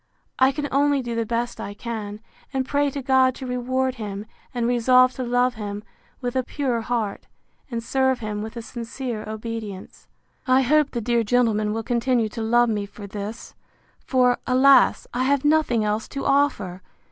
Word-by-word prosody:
I 260 Hz, +1 st, +5 dB
can 290 Hz, +1 st, -3 dB
only 280 Hz, 0 st, +2 dB
do 240 Hz, -1 st, -4 dB
the 230 Hz, -1 st, -1 dB
best 235 Hz, +1 st, -2 dB
I 205 Hz, -, -6 dB
can; 215 Hz, -2 st, -6 dB, 0.3 s
and 265 Hz, -2 st, -1 dB
pray 285 Hz, 0 st, +1 dB
to 275 Hz, 0 st, -5 dB
God 260 Hz, -1 st, +4 dB
to 265 Hz, -, -7 dB
reward 255 Hz, +1 st, -1 dB
him; 205 Hz, 0 st, -5 dB, 0.3 s
and 240 Hz, -2 st, -1 dB
resolve 250 Hz, +1 st, +4 dB
to 260 Hz, -, -4 dB
love 245 Hz, +1 st, +2 dB
him 205 Hz, -2 st, -6 dB, 0.4 s
with 245 Hz, 0 st, -3 dB
a 260 Hz, -, +3 dB
pure 255 Hz, -2 st, -2 dB
heart, 220 Hz, -3 st, -3 dB, 0.4 s
and 230 Hz, -2 st, -4 dB
serve 265 Hz, +1 st, +1 dB
him 210 Hz, -2 st, -4 dB
with 220 Hz, +2 st, -7 dB
a 230 Hz, -, -5 dB
sincere 235 Hz, -1 st, -5 dB
obedience. 220 Hz, -3 st, -7 dB, 0.4 s
I 260 Hz, +1 st, +5 dB
hope 300 Hz, +2 st, +3 dB
the 235 Hz, -, -3 dB
dear 235 Hz, +1 st, +1 dB
gentleman 220 Hz, -2 st, +2 dB
will 225 Hz, +1 st, -2 dB
continue 240 Hz, -1 st, +1 dB
to 225 Hz, -, -6 dB
love 240 Hz, +2 st, +3 dB
me 205 Hz, -2 st, -1 dB
for 205 Hz, 0 st, -10 dB
this; 205 Hz, +3 st, -7 dB, 0.5 s
for, 250 Hz, -2 st, +2 dB
alas! 265 Hz, +2 st, +5 dB
I 250 Hz, +2 st, 0 dB
have 280 Hz, +1 st, +1 dB
nothing 295 Hz, -7 st, +3 dB
else 210 Hz, +1 st, -1 dB
to 275 Hz, -, -5 dB
offer! 275 Hz, -11 st, +1 dB
240 Hz, 180 wpm, -23 LUFS, 220-260 Hz, 0.5 s, I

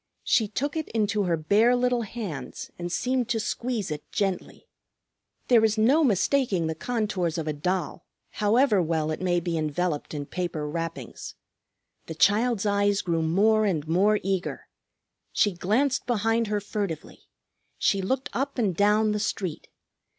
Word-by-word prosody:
She 220 Hz, -, +2 dB
took 280 Hz, +8 st, -3 dB
it 315 Hz, -1 st, -3 dB
into 210 Hz, -2 st, 0 dB
her 170 Hz, -2 st, +1 dB
bare 210 Hz, +10 st, +3 dB
little 245 Hz, -1 st, +1 dB
hands 195 Hz, -, -6 dB
and 175 Hz, 0 st, -4 dB
seemed 250 Hz, +3 st, 0 dB
to 230 Hz, -2 st, +1 dB
squeeze 220 Hz, -3 st, -2 dB
it 150 Hz, -1 st, -7 dB
gently. 195 Hz, -3 st, -3 dB, 0.8 s
There 235 Hz, -3 st, +5 dB
is 220 Hz, 0 st, +2 dB
no 265 Hz, +9 st, +4 dB
mistaking 215 Hz, -, +2 dB
the 160 Hz, -, -1 dB
contours 190 Hz, -4 st, -2 dB
of 160 Hz, -1 st, -3 dB
a 155 Hz, -, 0 dB
doll, 180 Hz, +3 st, -2 dB, 0.3 s
however 215 Hz, 0 st, +3 dB
well 160 Hz, -2 st, 0 dB
it 155 Hz, -, -4 dB
may 175 Hz, -1 st, +2 dB
be 170 Hz, -1 st, -2 dB
enveloped 155 Hz, 0 st, -2 dB
in 145 Hz, -1 st, -4 dB
paper 165 Hz, -3 st, -3 dB
wrappings. 165 Hz, -5 st, -5 dB, 0.7 s
The 160 Hz, -, -6 dB
child's 215 Hz, +4 st, +2 dB
eyes 205 Hz, 0 st, +2 dB
grew 165 Hz, -2 st, 0 dB
more 210 Hz, +7 st, +3 dB
and 160 Hz, -6 st, -1 dB
more 200 Hz, +6 st, +3 dB
eager. 190 Hz, -1 st, -2 dB, 0.7 s
She 205 Hz, -, +3 dB
glanced 220 Hz, +11 st, 0 dB
behind 225 Hz, 0 st, +1 dB
her 210 Hz, 0 st, 0 dB
furtively; 200 Hz, -5 st, -5 dB, 0.5 s
she 195 Hz, -, +2 dB
looked 260 Hz, +8 st, -2 dB
up 275 Hz, +3 st, -2 dB
and 205 Hz, -7 st, +1 dB
down 210 Hz, +3 st, +3 dB
the 210 Hz, -, -1 dB
street. 190 Hz, -5 st, -3 dB
200 Hz, 155 wpm, -26 LUFS, 170-225 Hz, 0.8 s, There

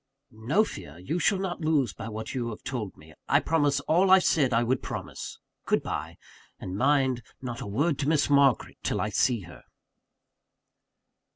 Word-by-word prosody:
"No 120 Hz, -, +1 dB
fear 85 Hz, -, -8 dB
you 125 Hz, -, -3 dB
shall 195 Hz, -, +2 dB
not 185 Hz, -2 st, -3 dB
lose 150 Hz, -, +1 dB
by 110 Hz, -, -7 dB
what 110 Hz, 0 st, -6 dB
you 120 Hz, -3 st, -2 dB
have 110 Hz, -, -8 dB
told 115 Hz, -7 st, -4 dB
me 80 Hz, +1 st, -16 dB, 0.2 s
I -, -, +5 dB
promise 145 Hz, -3 st, +1 dB
all 180 Hz, +6 st, +3 dB
I 190 Hz, -, +9 dB
said 150 Hz, -7 st, +2 dB
I 115 Hz, 0 st, +3 dB
would 125 Hz, +2 st, 0 dB
promise -, -, -6 dB, 0.3 s
good -, -, +2 dB
bye. -, -, -4 dB, 0.4 s
And 90 Hz, -, -6 dB
mind, 130 Hz, +1 st, +2 dB, 0.2 s
not 120 Hz, -2 st, -6 dB
a -, -, -5 dB
word 140 Hz, +8 st, 0 dB
to 140 Hz, 0 st, 0 dB
Miss 155 Hz, -2 st, +3 dB
Margaret 140 Hz, -3 st, +3 dB
till -, -, -1 dB
I -, -, 0 dB
see 120 Hz, -5 st, +1 dB
her!" 90 Hz, -2 st, -12 dB
130 Hz, 180 wpm, -27 LUFS, 110-155 Hz, 0.4 s, I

